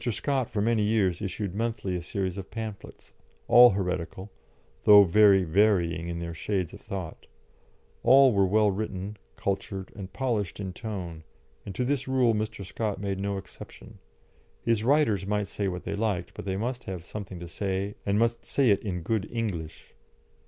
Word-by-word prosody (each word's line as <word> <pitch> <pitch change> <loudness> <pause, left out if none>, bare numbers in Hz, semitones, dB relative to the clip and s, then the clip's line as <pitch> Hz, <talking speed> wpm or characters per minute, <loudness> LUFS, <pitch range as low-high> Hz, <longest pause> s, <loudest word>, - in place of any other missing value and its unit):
Scott 130 +3 -1
for 105 -2 -1
many 115 -1 +2
years 105 -4 +1
issued 100 -1 -3
monthly 110 -3 -2
a 90 - -3
series 95 +1 -3
of 95 -2 -7
pamphlets, 110 -3 -8 0.3
all 120 +1 +9
heretical, 95 0 -3 0.5
though 105 -1 +9
very 100 +1 +5
varying 85 -2 +2
in 85 0 -4
their 85 0 -5
shades 90 0 -2
of - - -11
thought; 95 -5 -7 0.7
all 135 -1 +6
were 100 -1 +3
well 105 +1 +3
written, 100 0 -4 0.2
cultured, 95 -1 -3
and 95 -3 -8
polished 105 -3 -2
in 95 -2 -4
tone, 90 -6 -6 0.4
and 95 - -6
to 125 - -1
this 135 0 -1
rule 130 -3 +3
Mr. 105 -2 -3
Scott 105 +1 -3
made 100 -1 -3
no 100 0 -2
exception; 95 - -11 0.6
his 115 -2 +1
writers 115 - +2
might 105 0 0
say 100 - -3
what 90 -1 -4
they 100 - -3
liked, 100 -5 -2
but - - -8
they 95 -1 -2
must 120 +4 -3
have 90 -3 -6
something 100 -4 -7
to 85 - -7
say, 95 +3 -2
and 100 0 +1
must 115 +1 +1
say 135 -6 +2
it 100 - +2
in 90 -5 -4
good 105 +2 -1
English. 95 -10 -4
100 Hz, 175 wpm, -27 LUFS, 95-110 Hz, 0.7 s, all